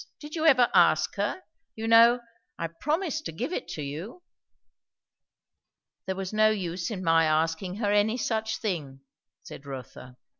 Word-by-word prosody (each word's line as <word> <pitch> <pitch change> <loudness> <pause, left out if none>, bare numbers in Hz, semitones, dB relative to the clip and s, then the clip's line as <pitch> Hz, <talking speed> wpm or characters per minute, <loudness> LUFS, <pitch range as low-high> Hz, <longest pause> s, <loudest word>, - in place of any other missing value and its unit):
Did 300 0 -10
you 320 -1 +1
ever 250 -5 +6
ask - - +4
her? 370 - -2 0.3
You 225 0 -4
know, 230 +2 +6 0.4
I 165 - -3
promised 310 - -2
to - - -4
give 245 - -4
it - - -4
to 150 - -5
you?" 170 - -7 1.8
"There 190 - -2
was 190 +1 -5
no 215 0 +4
use 180 -4 -3
in 195 -5 -5
my 165 -1 +4
asking 165 +4 0
her 205 -1 -1
any 210 +3 +2
such 220 -3 -2
thing,"' 150 -11 -4 0.4
said 140 - -11
Rotha. 125 -1 -9
205 Hz, 155 wpm, -27 LUFS, 165-235 Hz, 1.8 s, ever